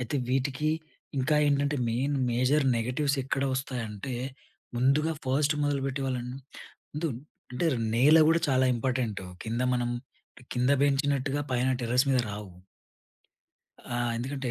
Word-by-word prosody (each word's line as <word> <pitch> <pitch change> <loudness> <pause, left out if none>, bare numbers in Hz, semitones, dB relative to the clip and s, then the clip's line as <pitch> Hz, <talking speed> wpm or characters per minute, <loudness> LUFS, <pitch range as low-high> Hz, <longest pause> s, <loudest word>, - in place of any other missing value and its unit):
అయితే 125 +3 -2
వీటికి 135 +3 0 0.5
ఇంకా 145 +4 +2
ఏంటంటే, 145 0 +2
మెయిన్, 135 +5 0 0.2
మేజర్ 130 +4 +2
నెగటివ్స్ 135 +5 0
ఎక్కడ 135 +1 -1
వస్తాయి 130 -3 -3
అంటే 120 +5 -5 0.6
ముందుగా 140 +6 +3
ఫస్ట్ 145 +3 +2
మొదలుపెట్టే 135 -1 -1
వాళ్ళున్ 125 -1 -3 0.6
ముందు 155 +3 -1 0.4
అంటే 125 +7 0 0.3
నేల 145 +7 +6
కూడా 165 +1 +4
చాలా 130 -1 +3
ఇంపార్టెంటు. 120 -5 -1 0.2
కింద 115 +2 -2
మనం 120 -1 0 0.6
కింద 125 +2 +1
పెంచినట్టుగా 140 0 +1
పైన 125 +1 +1
టెర్రస్ 125 +3 +3
మీద 130 - +3
రావు. 100 -1 -7 1.4
ఆహ్, 120 0 0
ఎందుకంటే 130 +1 -3
130 Hz, 125 wpm, -28 LUFS, 125-145 Hz, 1.4 s, నేల